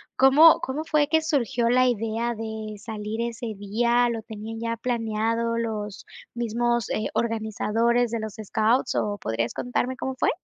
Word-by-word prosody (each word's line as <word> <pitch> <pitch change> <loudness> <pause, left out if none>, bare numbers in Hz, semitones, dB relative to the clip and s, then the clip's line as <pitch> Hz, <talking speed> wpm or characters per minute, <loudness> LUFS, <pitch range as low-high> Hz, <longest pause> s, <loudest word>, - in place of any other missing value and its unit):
¿Cómo 290 +5 +7
cómo 285 +4 -3
fue 300 -2 +2
que 320 0 +3
surgió 240 -6 +1
la 255 +1 +4
idea 230 0 -1
de 220 -1 -6
salir 215 0 -5
ese 235 0 -4
día? 235 +4 +2
¿Lo 225 -1 -3
tenían 220 0 -7
ya 230 0 -2
planeado 230 -1 -1
los 215 -3 -4 0.3
mismos, 235 0 0
eh, 215 - -1
organizadores 230 +1 0
de 230 - -1
los 220 -1 -6
scouts 225 +6 +1
o 205 -1 0
podrías 115 +1 -2
contarme 250 +1 -2
cómo 265 -1 -3
fue? - - +1
230 Hz, 155 wpm, -25 LUFS, 220-245 Hz, 0.3 s, Cómo